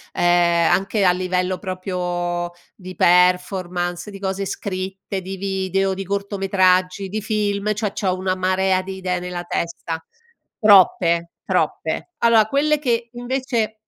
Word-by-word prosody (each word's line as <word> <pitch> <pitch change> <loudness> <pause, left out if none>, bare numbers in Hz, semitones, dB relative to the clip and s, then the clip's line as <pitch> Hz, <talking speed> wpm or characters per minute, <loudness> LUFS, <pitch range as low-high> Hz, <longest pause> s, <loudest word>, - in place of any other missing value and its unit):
uhm, - - -1
anche 175 +3 +3
a 180 - +6
livello 185 0 -1
proprio 180 -2 -3 0.3
di 185 -1 -10
performance, 180 0 +2
di 200 - -9
cose 195 0 -3
scritte, 190 0 -4
di 190 +1 -6
video, 195 0 -1
di 195 +1 -5
cortometraggi, 195 -1 +1
di 215 +2 -3
film, 210 0 -1
cioè, 210 -1 -2
c'ho 190 -2 -1
una 185 0 -1
marea 185 0 +1
di 190 +1 -7
idee 185 -1 -2
nella 180 0 -5
testa. 170 -1 -4 0.5
Troppe. 175 -5 +4
Troppe. - - -1
Allora, 230 -2 +5
quelle 300 +5 +2
che 240 -4 -1
invece 240 -3 -2
190 Hz, 130 wpm, -21 LUFS, 180-200 Hz, 0.5 s, a